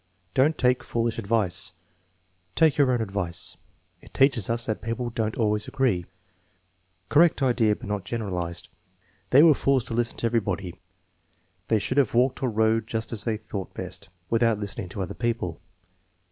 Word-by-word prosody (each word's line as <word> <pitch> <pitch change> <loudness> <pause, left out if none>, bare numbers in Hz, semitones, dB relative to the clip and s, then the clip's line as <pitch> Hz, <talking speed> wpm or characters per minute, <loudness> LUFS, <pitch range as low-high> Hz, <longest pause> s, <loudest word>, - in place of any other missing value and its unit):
"Don't 150 +4 +3
take 125 0 +2
foolish 115 -1 -1
advice." 100 -5 0 0.8
"Take 160 -3 +4
your 140 -4 +3
own 120 -2 +1
advice." 95 -5 -3 0.4
"It - - -18
teaches 130 -7 +3
us 115 0 0
that 110 - -2
people 120 +1 -3
don't 110 -1 -2
always 105 -2 0
agree." 110 -10 0 1.0
Correct 155 -1 +4
idea 120 -5 +3
but - - -11
not 105 -2 -2
generalized: 90 -6 -4 0.6
"They 140 +4 +7
were 165 -2 +8
fools 135 -3 +1
to 120 - -5
listen 120 0 -1
to - - -2
everybody." 100 -6 -1 0.9
"They 110 - +3
should 130 +7 0
have 125 -5 +1
walked 125 +2 +2
or 130 - +1
rode 110 0 +1
just 115 0 -3
as 110 - -4
they 110 -2 0
thought 100 -3 -7
best, 95 +1 -8 0.2
without 115 -1 +2
listening 100 -3 -5
to 95 +2 -4
other 90 - -5
people." 115 -8 -2
115 Hz, 160 wpm, -26 LUFS, 100-125 Hz, 1.0 s, were